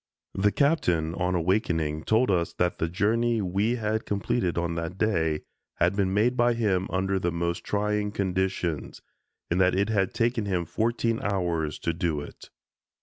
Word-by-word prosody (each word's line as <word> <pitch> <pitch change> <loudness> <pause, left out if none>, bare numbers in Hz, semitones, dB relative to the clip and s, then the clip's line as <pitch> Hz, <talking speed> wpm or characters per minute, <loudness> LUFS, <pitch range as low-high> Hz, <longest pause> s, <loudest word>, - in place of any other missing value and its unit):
The 105 +2 +2
Captain, 90 - +1
on 90 +1 -1
awakening, 80 -4 0
told 110 +1 +3
us 85 -3 0
that 90 0 -1
the 80 - 0
journey 115 +6 +1
we 100 +5 0
had 110 -1 -2
completed 100 -3 -1
on 85 0 0
that 85 +2 -4
day 80 -8 +1 0.3
had - - +2
been 100 -2 +1
made 110 +6 +2
by 120 -1 +3
him 95 -5 +1
under 95 +1 0
the 90 -1 0
most 85 0 -2
trying 105 0 -1
conditions, 95 -5 -2 0.5
and 90 +2 +2
that 90 0 +3
it 100 +3 +1
had 100 -4 +1
taken 115 -2 +1
him 90 -3 0
fourteen 115 +4 0
hours 85 -6 -1
to 85 - -2
do 85 -3 -1
it. 75 - -10
95 Hz, 165 wpm, -27 LUFS, 85-110 Hz, 0.5 s, told